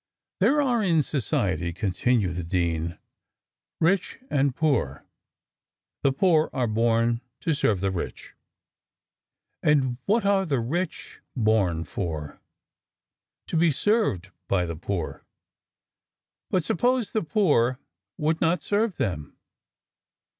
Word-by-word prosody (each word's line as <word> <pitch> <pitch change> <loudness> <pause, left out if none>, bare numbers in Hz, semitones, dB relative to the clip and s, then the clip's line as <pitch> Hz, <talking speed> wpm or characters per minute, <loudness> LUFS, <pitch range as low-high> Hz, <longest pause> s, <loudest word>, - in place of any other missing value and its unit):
There 295 +1 +4
are 245 -4 +1
in 165 -6 +3
society," 95 - -1
continued 95 +1 0
the 90 - -3
dean, 85 -1 -1 0.8
"rich 180 +3 +1
and 140 -2 +2
poor; 135 - 0 1.0
the 140 - +3
poor 155 +2 +3
are 130 -3 0
born 115 +1 +1 0.2
to 165 - +1
serve 110 -10 +1
the 100 -1 0
rich." 90 -2 -6 1.3
"And 130 -4 +2
what 215 +1 +2
are 200 -1 +3
the 145 -8 0
rich 160 +9 -3 0.2
born 105 -8 +2
for?" 80 -3 -5 1.0
"To - - -5
be 165 +1 +4
served 145 - +1 0.2
by 90 -3 +1
the 85 -1 -4
poor." 85 0 -4 1.3
"But 185 - +1
suppose 245 +7 +1
the 220 - 0
poor 150 - +2 0.4
would 160 +2 0
not 165 -1 +2
serve 205 0 0
them?" 90 - -3
130 Hz, 115 wpm, -25 LUFS, -, 1.3 s, There